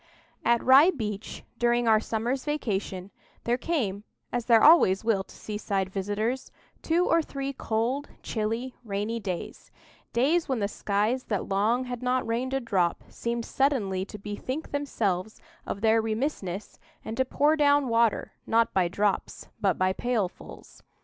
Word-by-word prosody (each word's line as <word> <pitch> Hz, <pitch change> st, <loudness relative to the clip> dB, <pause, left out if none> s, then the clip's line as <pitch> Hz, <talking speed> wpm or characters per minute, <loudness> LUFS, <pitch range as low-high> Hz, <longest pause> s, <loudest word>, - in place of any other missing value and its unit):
AT 235 Hz, 0 st, +3 dB
Rye 275 Hz, +6 st, +7 dB
Beach, 215 Hz, -, -4 dB, 0.2 s
during 240 Hz, 0 st, +2 dB
our 220 Hz, -1 st, +6 dB
summer's 235 Hz, +4 st, -2 dB
vacation, 200 Hz, -10 st, -3 dB, 0.3 s
there 235 Hz, -, +1 dB
came, 225 Hz, -, -1 dB, 0.3 s
as 240 Hz, -1 st, -1 dB
there 230 Hz, -2 st, +5 dB
always 260 Hz, -, +6 dB
will 215 Hz, -4 st, +1 dB
to -, -, -16 dB
seaside 200 Hz, -3 st, -3 dB
visitors, 205 Hz, +6 st, -2 dB, 0.3 s
two 340 Hz, +2 st, +2 dB
or 330 Hz, 0 st, +3 dB
three 275 Hz, -2 st, -4 dB
cold, 245 Hz, +4 st, -1 dB
chilly, 225 Hz, +3 st, -2 dB
rainy 210 Hz, +2 st, -2 dB
days,—days 240 Hz, -, -3 dB
when 260 Hz, -, +1 dB
the 200 Hz, -2 st, 0 dB
skies 210 Hz, +5 st, -1 dB
that 205 Hz, -3 st, -2 dB
long 215 Hz, +6 st, +1 dB
had 245 Hz, -1 st, -6 dB
not 255 Hz, 0 st, 0 dB
rained 250 Hz, +4 st, -1 dB
a -, -, +1 dB
drop 190 Hz, -8 st, 0 dB
seemed 235 Hz, 0 st, -3 dB
suddenly 220 Hz, -10 st, 0 dB
to 210 Hz, -, -9 dB
bethink 210 Hz, +9 st, -5 dB
themselves 220 Hz, -9 st, -2 dB, 0.3 s
of 200 Hz, -, -4 dB
their 225 Hz, 0 st, +4 dB
remissness, 215 Hz, -, -3 dB, 0.3 s
and 220 Hz, -, -4 dB
to 260 Hz, -, +3 dB
pour 290 Hz, +4 st, +2 dB
down 290 Hz, -2 st, +3 dB
water, 230 Hz, -2 st, +2 dB, 0.2 s
not 230 Hz, 0 st, +2 dB
by 185 Hz, -2 st, +3 dB
drops, 200 Hz, +3 st, -1 dB
but 195 Hz, -3 st, +2 dB
by 185 Hz, 0 st, +2 dB
pailfuls. 220 Hz, -5 st, -4 dB
230 Hz, 150 wpm, -27 LUFS, 205-260 Hz, 0.3 s, Rye